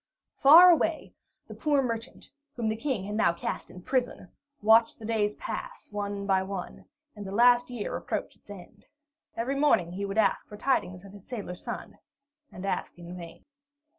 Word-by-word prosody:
Far 335 +6 +9
away, 325 -1 0 0.3
the - - -9
poor 290 -3 +1
merchant, 230 -1 -5 0.2
whom 230 -3 -1
the 220 - -1
King 235 -4 -2
had 205 +2 -5
now 210 -5 +2
cast 170 - -5
in 180 - -12
prison, 245 -7 -2 0.3
watched 225 +2 +4
the 220 - -10
days 210 -2 0
pass - - -7
one 205 -1 -4
by 190 -1 +2
one, 190 -1 -6 0.3
and 205 - -8
the 190 - -7
last 245 +3 +4
year 240 -4 -4
approach - - -4
its - - -33
end. 190 -4 -12 0.5
Every 240 +4 -1
morning 180 - +3
he 195 +3 -4
would 200 +1 -5
ask 205 -3 +2
for 210 - -10
tidings 190 -8 -1
of 195 - -13
his 200 -2 -15
sailor 210 -7 -5
son, 180 - -8 0.5
and 185 - -8
ask 195 - -3
in 175 +1 -9
vain. 170 -1 -11
210 Hz, 180 wpm, -28 LUFS, 190-245 Hz, 0.5 s, Far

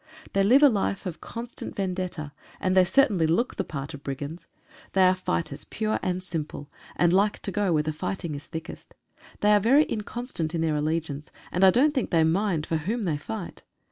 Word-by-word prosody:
They 195 - +3
live 250 +9 +6
a - - +10
life 200 -4 0
of 180 -3 -5
constant 235 +1 -7
vendetta, 185 -6 -3 0.3
and 185 0 +1
they 185 -1 +6
certainly 195 - +3
look 200 +10 +1
the - - 0
part 145 +1 -6
of 145 - -8
brigands. 145 +4 -6 0.5
They 190 - +5
are 185 0 +6
fighters 140 - -3
pure 215 0 -1
and 185 -1 -2
simple, 155 -4 -5 0.2
and 175 0 +3
like 205 +2 +3
to 195 - -3
go 205 -2 +1
where 155 -2 +2
the 155 0 -2
fight 185 +4 -4
is 150 -3 -5
thickest. 160 0 -8 0.5
They 210 - +4
are 205 - +6
very 260 +9 +5
inconstant 210 -7 -4
in 165 - 0
their 160 -2 +1
allegiance, 150 -1 -2 0.2
and 180 - +1
I 190 - +9
don't 275 +10 +4
think 260 -5 -1
they 165 -2 +4
mind 165 -1 +1
for 165 - 0
whom 215 +9 -2
they 160 -6 0
fight. 180 +5 -7
180 Hz, 205 wpm, -26 LUFS, 155-205 Hz, 0.5 s, a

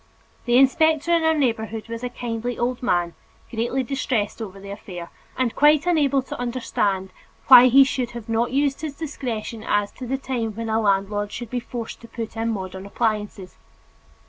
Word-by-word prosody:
The 240 0 +4
inspector 315 +4 +4
in 335 - +4
our 320 0 +2
neighborhood 225 -5 -1
was 230 +1 -6
a 250 - -2
kindly 240 0 -4
old 240 +1 -1
man, 175 -8 +1 0.4
greatly 240 +3 -1
distressed 245 -5 -2
over 195 -3 -7
the 200 0 -9
affair, 180 -4 -8 0.3
and 255 -3 0
quite 300 +1 +5
unable 285 -6 +2
to - - -7
understand 210 -6 -1 0.4
why 250 -1 +10
he 270 +2 +7
should 255 -2 -2
have 230 -1 -9
not 230 +1 +1
used 280 +1 0
his 305 -3 -5
discretion 245 -7 -5
as 205 0 0
to 255 - -8
the 270 +2 -1
time 245 -5 -3
when 230 0 -4
a 220 +1 +1
landlord 205 0 0
should 240 -2 -7
be 250 - -1
forced 235 -1 -7
to 230 - -11
put 230 -1 -6
in 225 +1 -1
modern 190 -2 -5
appliances. 210 -4 -2
235 Hz, 180 wpm, -23 LUFS, 210-265 Hz, 0.4 s, why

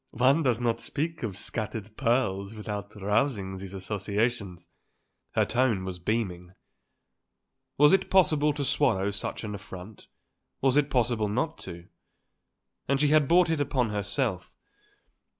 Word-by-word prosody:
"One 135 +6 +4
doesn't 120 -4 +1
speak 160 +2 -3
of 105 -6 -4
scattered 110 0 -3
pearls 110 -5 0
without 105 -1 -6
rousing 105 -1 0
these 95 0 -8
associations." 100 -1 -2 0.7
Her - - +3
tone 115 -4 +1
was 90 -1 -5
beaming. 90 -3 -2 1.2
Was 150 +3 +6
it 190 0 +2
possible 155 -5 +4
to 145 -1 -3
swallow 100 -5 +2
such 100 - -4
an 105 -1 -4
affront? 100 0 -10 0.5
Was 135 -1 +2
it 145 -1 +3
possible 120 -4 +1
not 130 +10 -1
to? 85 -1 -9 1.0
And 140 +1 +2
she 150 0 +3
had 150 -2 +4
brought 175 +1 +4
it 160 -3 0
upon 130 -5 0
herself. 100 -1 -2
110 Hz, 130 wpm, -28 LUFS, 100-135 Hz, 1.2 s, Was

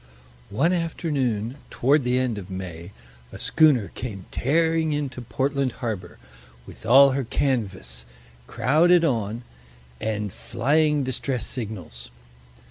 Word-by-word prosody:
One 150 - +2
afternoon, 140 - -1
toward 140 +3 +2
the 125 +1 +1
end 125 -5 0
of 95 -1 -10
May, 90 -2 -7 0.4
a - - -8
schooner 140 -10 +3
came 100 -6 -7
tearing 160 +2 +1
into 140 -4 -3
Portland 135 +2 -1
harbor, 105 -8 -5 0.5
with 110 - -11
all 135 +3 +8
her 135 +1 -1
canvas, 95 - -2 0.4
crowded 170 +5 +4
on, 115 -4 -1 0.6
and 105 -3 -2
flying 150 +4 +1
distress 130 -2 -2
signals. 95 - -6
125 Hz, 115 wpm, -24 LUFS, 105-145 Hz, 0.6 s, all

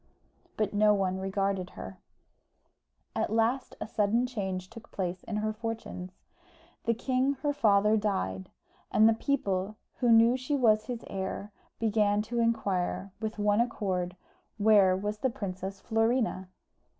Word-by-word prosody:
But 210 -1 0
no 210 0 +4
one 190 -1 0
regarded 195 -1 -1
her. 95 0 -8 1.2
At - - -1
last 230 +4 +1
a - - -3
sudden 220 +3 +1
change 190 -7 -4
took 230 0 -12
place 180 -1 -3
in 220 - -4
her 215 +1 -1
fortunes. 220 -5 -6 0.7
The 230 - +2
king 260 +3 +1
her 290 -1 +1
father 210 -5 +4
died, 190 - -2 0.4
and 215 +1 +6
the 225 - +5
people, 210 -5 -1 0.2
who 245 -2 +3
knew 230 +2 +6
she 260 +3 -2
was 215 -5 +3
his 245 -2 -5
heir, 195 +1 -4 0.3
began 210 -2 +2
to 235 +2 -3
inquire, 200 -4 0
with 220 0 -4
one 205 +1 +3
accord, 185 -6 -2 0.4
where 205 -3 +5
was 210 +2 -3
the 260 - +1
Princess 195 -4 -5
Florina? 225 -3 0
210 Hz, 140 wpm, -29 LUFS, 195-230 Hz, 1.2 s, and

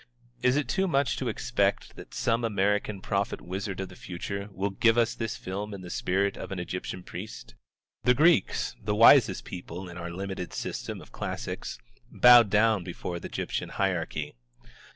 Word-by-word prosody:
Is 125 +1 +3
it 145 -4 0
too 190 +8 +1
much 140 -6 +1
to - - -2
expect - - 0
that - - -11
some 115 0 +1
American 105 -1 0
prophet 100 +1 -1
wizard 95 +1 -5
of 95 - -5
the 90 - -12
future 100 +4 -5
will 95 +1 -2
give 115 +4 +3
us 120 -1 +3
this 115 -2 -3
film 100 +2 -5
in 95 - -9
the 90 -1 -8
spirit 95 +2 0
of - - -7
an 95 - -3
Egyptian 90 +1 -5
priest? 90 - -8 0.5
The 125 - +4
Greeks, 155 - +3
the 105 0 0
wisest 115 -2 +6
people 90 0 -7
in 85 0 -9
our 85 0 -5
limited 95 0 -5
system - - -4
of - - -15
classics, - - -5 0.3
bowed 120 -3 +8
down 110 -1 +3
before 85 0 -5
the - - -6
Egyptian - - -3
hierarchy. 85 -6 -2
100 Hz, 175 wpm, -28 LUFS, 90-115 Hz, 0.5 s, bowed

